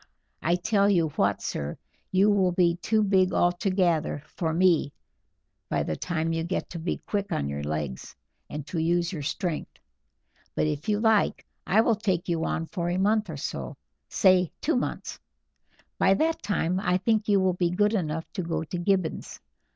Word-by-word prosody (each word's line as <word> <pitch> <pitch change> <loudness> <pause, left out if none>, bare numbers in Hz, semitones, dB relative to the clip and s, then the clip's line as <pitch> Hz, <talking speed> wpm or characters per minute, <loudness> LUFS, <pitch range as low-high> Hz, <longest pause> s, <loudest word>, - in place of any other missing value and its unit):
I 170 +2 +2
tell 200 +2 +2
you 170 -5 +3
what, - - 0
sir; 70 +1 -4 0.3
you 195 +3 +4
will 190 -3 +3
be 175 -1 +3
too 215 +4 +1
big 190 -2 +3
altogether 175 -4 +1
for 160 +1 -3
me 165 -4 +3 0.8
by - - 0
the 80 - -2
time 165 - -2
you 165 0 -1
get 175 +3 -3
to 170 - -5
be 165 - -2
quick 200 -1 -2
on 70 - -1
your 70 0 -4
legs, 75 -3 -4 0.3
and 150 -1 -6
to 165 - -3
use 170 +2 +1
your 155 - -4
strength, 155 +3 -3 0.8
but - - +1
if 150 +4 -2
you 210 -1 +2
like 220 -2 +2 0.2
I 210 +4 +5
will 230 - +3
take 190 -5 -1
you 165 -2 0
on 165 - -1
for 170 0 -3
a 175 - 0
month 210 +1 +2
or 155 - -5
so 70 - -5 0.3
say, 185 -2 +4
two 320 - 0
months; 250 - -3 0.8
by 195 - +5
that 325 +8 0
time 185 -3 0
I 180 -2 +1
think 215 +3 +1
you 200 -2 +4
will 190 -1 +2
be 175 -1 0
good 205 +4 +2
enough 160 -5 -1
to 190 - -2
go 165 -1 -2
to 175 +2 -5
Gibbons. 185 -2 -1
180 Hz, 180 wpm, -27 LUFS, 160-200 Hz, 0.8 s, I